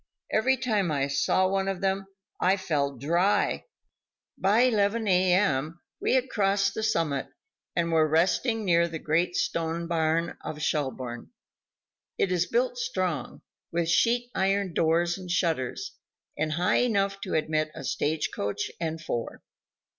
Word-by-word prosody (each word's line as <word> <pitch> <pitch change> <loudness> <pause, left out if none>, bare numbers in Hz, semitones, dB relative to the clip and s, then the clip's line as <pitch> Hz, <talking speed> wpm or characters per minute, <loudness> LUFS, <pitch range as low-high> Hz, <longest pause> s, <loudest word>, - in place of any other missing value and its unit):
Every 260 +5 +3
time 215 -9 0
I 140 -2 0
saw 140 +7 +2
one 195 0 0
of 195 -2 -2
them 195 0 -1 0.3
I 190 +2 +3
felt 140 -8 -1
dry. 170 - +1 0.7
By 205 +5 +3
11 220 -2 +2
a. 185 -1 +4
m. 160 -4 0 0.2
we - - +1
had 260 0 +2
crossed 200 -3 +1
the - - -3
summit 160 -10 0 0.5
and 170 -1 0
were 160 -1 +4
resting 200 - +1
near 170 -2 +4
the 165 -1 -5
great 170 +3 0
stone 165 0 -1
barn 165 0 0
of 150 - -5
Schelbourne. 130 -6 -3 0.9
It 190 - +1
is 180 -1 +1
built - - 0
strong, 470 +1 -3 0.3
with 165 0 0
sheet 240 +6 +2
iron 195 -1 0
doors 170 +3 +1
and 185 -1 -9
shutters, 165 -8 -1 0.4
and 155 0 -1
high 180 +6 +2
enough 200 -4 +1
to 185 - -3
admit 155 0 0
a - - -7
stage 150 +1 -1
coach 100 0 -3
and 160 -1 -3
four. 120 -7 -4
175 Hz, 145 wpm, -27 LUFS, 160-200 Hz, 0.9 s, a